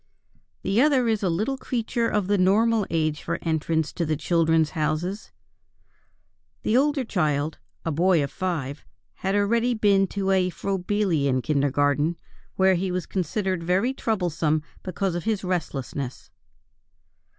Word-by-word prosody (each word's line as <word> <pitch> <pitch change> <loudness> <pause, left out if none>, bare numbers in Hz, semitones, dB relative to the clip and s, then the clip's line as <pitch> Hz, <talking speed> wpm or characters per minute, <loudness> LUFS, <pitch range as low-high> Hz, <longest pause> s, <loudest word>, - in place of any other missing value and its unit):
The 205 +5 +2
other 270 -4 +3
is 220 -2 +1
a 190 - +1
little 215 +11 -1
creature 235 -1 -1
of 210 -2 0
the 200 +1 +1
normal 210 +3 +3
age 155 -2 0
for - - -2
entrance 160 -1 0
to 175 - -2
the 155 -1 0
Children's 165 -1 +2
Houses. 165 +6 -2 1.3
The 215 - +1
older 285 +1 +3
child 155 - -1 0.3
(a 165 - 0
boy 170 0 +3
of 140 - -4
five) 155 -7 -3 0.3
had 195 +1 -2
already 230 +4 +2
been 200 -3 +3
to 195 0 -1
a 185 -1 +3
Froebelian 180 -9 0
Kindergarten, 145 +2 +1 0.4
where 190 0 +4
he 185 +1 -1
was 180 -1 -2
considered 190 0 -2
very 185 +9 +1
troublesome 165 - 0 0.2
because 185 0 -2
of 175 +2 -4
his 215 -3 0
restlessness. 140 -7 -4
185 Hz, 140 wpm, -25 LUFS, 155-205 Hz, 1.3 s, where